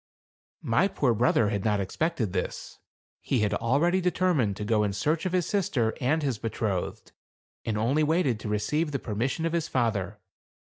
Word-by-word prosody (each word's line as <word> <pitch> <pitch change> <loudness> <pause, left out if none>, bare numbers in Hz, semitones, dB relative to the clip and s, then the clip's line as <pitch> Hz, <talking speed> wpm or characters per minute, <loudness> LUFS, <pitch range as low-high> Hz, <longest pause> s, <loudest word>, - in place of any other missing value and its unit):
My 115 +12 +3
poor 135 -10 +1
brother 115 -1 +3
had 100 -3 -2
not 105 -2 +1
expected 115 - -1
this. - - -4 0.4
He 125 - 0
had 105 -1 +1
already 145 - +2
determined 175 - +1
to 105 - -4
go 110 0 +2
in 100 -1 -1
search 155 - 0
of - - -3
his 180 -2 +1
sister 180 - 0
and 150 +5 +1
his 130 -6 -1
betrothed, 110 -4 -3 0.5
and 110 -2 -1
only 125 +8 +2
waited 150 -7 +1
to 105 - -5
re 105 - +1
ceive 150 +8 -1
the - - +1
permission 125 +7 -2
of 165 - -1
his 170 -2 0
father. 105 -5 -1
125 Hz, 180 wpm, -27 LUFS, 105-160 Hz, 0.5 s, My